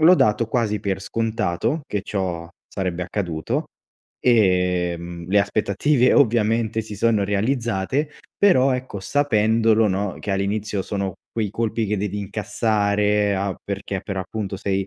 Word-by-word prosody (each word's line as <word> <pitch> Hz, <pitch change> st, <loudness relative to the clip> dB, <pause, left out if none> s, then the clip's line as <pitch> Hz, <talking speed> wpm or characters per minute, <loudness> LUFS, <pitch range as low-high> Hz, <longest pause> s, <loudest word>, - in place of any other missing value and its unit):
l'ho 170 Hz, +4 st, +8 dB
dato 110 Hz, -5 st, +2 dB
quasi 110 Hz, -2 st, 0 dB
per 95 Hz, -2 st, -2 dB
scontato, 115 Hz, -, -1 dB
che 105 Hz, -2 st, -2 dB
ciò 90 Hz, -5 st, -3 dB, 0.2 s
sarebbe 90 Hz, -2 st, -3 dB
accaduto 85 Hz, -4 st, -2 dB, 0.5 s
e, 90 Hz, -6 st, +3 dB
mhmm, 85 Hz, 0 st, -8 dB
le 100 Hz, -, +4 dB
aspettative 110 Hz, +6 st, +2 dB
ovviamente 115 Hz, -3 st, +2 dB
si 105 Hz, -1 st, -8 dB
sono 110 Hz, 0 st, +2 dB
realizzate 115 Hz, +5 st, 0 dB, 0.3 s
però, 135 Hz, -10 st, +5 dB
ecco, 125 Hz, -4 st, -4 dB
sapendolo, 110 Hz, -2 st, +3 dB
no, 95 Hz, 0 st, -1 dB
che 105 Hz, -, -4 dB
all'inizio 100 Hz, +1 st, -1 dB
sono 100 Hz, -1 st, -3 dB, 0.2 s
quei 110 Hz, -3 st, -1 dB
colpi 115 Hz, 0 st, -1 dB
che 105 Hz, +1 st, 0 dB
devi 105 Hz, +1 st, -2 dB
incassare 105 Hz, 0 st, +1 dB
a 95 Hz, 0 st, -1 dB
perché 100 Hz, -1 st, -4 dB
per 100 Hz, -, -5 dB
appunto 95 Hz, +1 st, -4 dB
sei, 95 Hz, -1 st, -1 dB
105 Hz, 135 wpm, -22 LUFS, 95-115 Hz, 0.5 s, l'ho